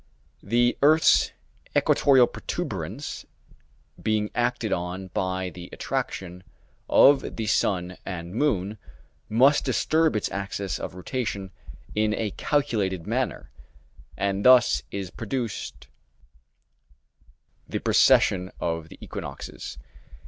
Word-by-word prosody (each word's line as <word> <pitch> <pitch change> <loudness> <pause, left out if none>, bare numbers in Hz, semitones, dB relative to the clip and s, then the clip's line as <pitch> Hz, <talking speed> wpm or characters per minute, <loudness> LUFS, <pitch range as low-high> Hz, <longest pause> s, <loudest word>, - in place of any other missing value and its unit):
The 120 +4 +1
earth's 155 +3 +5 0.5
equatorial 135 -3 +5
protuberance, - - -5 0.7
being 105 -1 0
acted 120 -2 0
on 90 +2 -4
by 95 -2 -2
the 90 0 -10
attraction 90 -1 -4 0.5
of 140 -1 +5
the 110 - -3
sun 90 -3 0
and 85 -2 -6
moon, 110 -6 0 0.5
must 135 +7 +4
disturb 160 -3 +2
its 105 - 0
axis 100 0 -3
of - - -6
rotation 100 -1 -4 0.4
in 105 0 +1
a 110 -2 -2
calculated 105 - -1
manner; - - -2 0.7
and 100 0 -1
thus 125 -2 +6
is 95 -3 -5
produced 115 0 -5 1.8
the - - -2
precession 90 0 +4
of 80 -1 -3
the - - -12
equinoxes. 70 0 -7
100 Hz, 100 wpm, -25 LUFS, 95-120 Hz, 1.8 s, thus